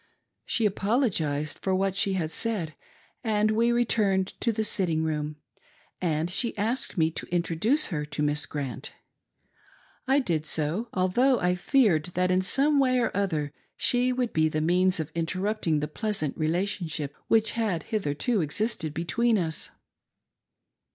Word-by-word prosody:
She 230 - +1
apologised 195 - 0
for 190 -1 0
what 190 0 0
she 195 0 +2
had 165 -4 -2
said, 185 -4 -1 0.5
and 215 -2 +2
we 230 +2 +2
returned 210 -5 +2
to 235 - +2
the 220 0 -1
sitting 170 -7 0
room, 150 -1 -2 0.7
and 160 -2 0
she 220 +7 -1
asked 225 +2 -2
me 160 -1 +3
to - - -6
introduce 180 - +1
her 150 -2 -1
to 150 0 -2
Miss 150 -1 +1
Grant. 135 -6 -5 1.1
I 265 +2 +4
did 165 - 0
so, 160 +11 -1
although 240 +8 +2
I 180 0 +2
feared 180 - +2
that 180 0 +2
in 185 0 +3
some 280 +9 +3
way 255 -2 +3
or 240 - +1
othec 165 -8 -1 0.3
she 250 +1 +3
would 250 -2 -1
be 155 0 +3
the 155 - -1
means 180 +3 +2
of 160 0 -4
interrupting 170 -1 -1
the 150 - -1
pleasant 195 -2 -2
relation 175 +3 -1
ship 145 -2 -4
which 225 0 +3
had 205 -9 -1
hitherto 205 - 0
existed 165 -1 -2
between 225 +8 +1
us. 160 -5 -3
185 Hz, 150 wpm, -27 LUFS, 160-225 Hz, 1.1 s, I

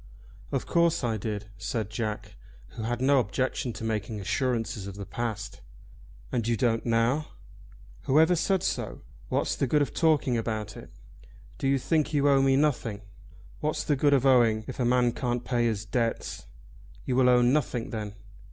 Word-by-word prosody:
"Of - - -1
course 170 -4 +2
I 115 -2 0
did," 105 0 -4
said 105 0 -3
Jack, 105 -2 -4 0.3
who - - -8
had 120 +2 -2
no 140 +1 +4
objection 125 +2 -1
to - - -8
making 110 -1 -2
assurances 115 -1 -1
of 100 - -7
the 100 0 -7
past. 110 -2 -5 0.7
"And 115 -2 -1
you 115 -1 +1
don't 115 0 +1
now?" 120 +6 +2 0.8
"Whoever 160 +6 +4
said 185 +3 +1
so? - - -3 0.3
What's - - 0
the 135 - 0
good 150 +3 +3
of - - -5
talking 145 -7 +2
about 110 -2 -3
it?" - - -11 0.7
"Do 135 - 0
you 135 0 +3
think 155 +3 0
you 145 0 +3
owe 140 -1 +5
me 135 0 +4
nothing?" 125 -8 0 0.6
"What's 155 +1 -1
the 145 - +1
good 145 +1 +4
of 135 -1 +1
owing, 115 -5 +4
if - - -8
a 125 - +1
man 120 0 +3
can't 120 -1 -2
pay 120 -2 +1
his 110 -1 -2
debts?" 115 +1 -2 0.6
"You 125 - -1
will 130 -1 +5
own 125 0 +5
nothing 125 -5 -1
then?" 105 -2 -5
120 Hz, 175 wpm, -27 LUFS, 110-135 Hz, 0.8 s, owe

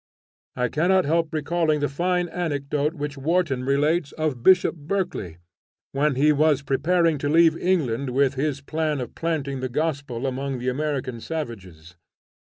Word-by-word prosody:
I 125 -1 0
cannot 180 +8 +2
help 165 +1 +1
recalling 155 0 0
the 145 - +1
fine 175 +4 0
anecdote 150 -2 -2
which 145 -2 -5
Warton 155 -3 0
relates 145 +3 +1
of 155 -6 -2
Bishop 180 +3 +5
Berkeley, 155 - -3 0.5
when 140 0 +1
he 150 +4 +4
was 150 -1 +2
preparing 155 +3 +1
to 145 - -1
leave 165 +1 +5
England 140 -9 0
with 135 +1 +2
his 140 0 -2
plan 155 0 -2
of 125 -2 -6
planting 145 -5 -2
the 130 0 -3
gospel 140 -3 -2
among 135 0 -2
the 125 +1 -2
American 130 -3 -2
savages. 95 - -7
145 Hz, 150 wpm, -24 LUFS, 135-160 Hz, 0.5 s, Bishop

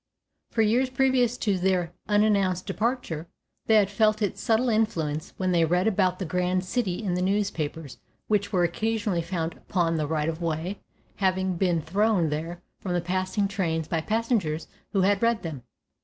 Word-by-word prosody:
For 225 -1 +2
years 245 +5 +2
previous 255 -2 +2
to 200 -6 0
their 180 -2 +1 0.2
unannounced 200 -3 +2
departure 215 -9 -2 0.4
they 220 - +5
had 205 -2 +4
felt 215 +1 +3
its 200 - -2
subtle 235 +1 +2
influence 165 -9 -1
when 185 -1 0
they 170 -2 +3
read 180 +3 +2
about 185 -4 +2
the 190 - -4
grand 180 +2 0
city 210 -2 -1
in 190 -4 -1
the 180 - 0
newspapers 165 - -2 0.3
which 205 -1 +1
were 180 -4 +2
occasionally 205 +1 0
found 165 -1 -3
upon 165 -3 -1
the 155 -2 -1
right 155 0 0
of 165 +1 -3
way, 165 +4 -2 0.4
having 190 -1 +1
been 170 -3 +1
thrown 195 -1 +2
there 165 +4 -4 0.2
from 185 - -3
the 175 - +2
passing 185 +3 0
trains 165 -5 -1
by 165 - -1
passengers 215 -6 0 0.2
who 195 - +2
had 200 +1 +3
read 230 -1 +2
them. 155 -6 -5
185 Hz, 170 wpm, -26 LUFS, 170-215 Hz, 0.4 s, they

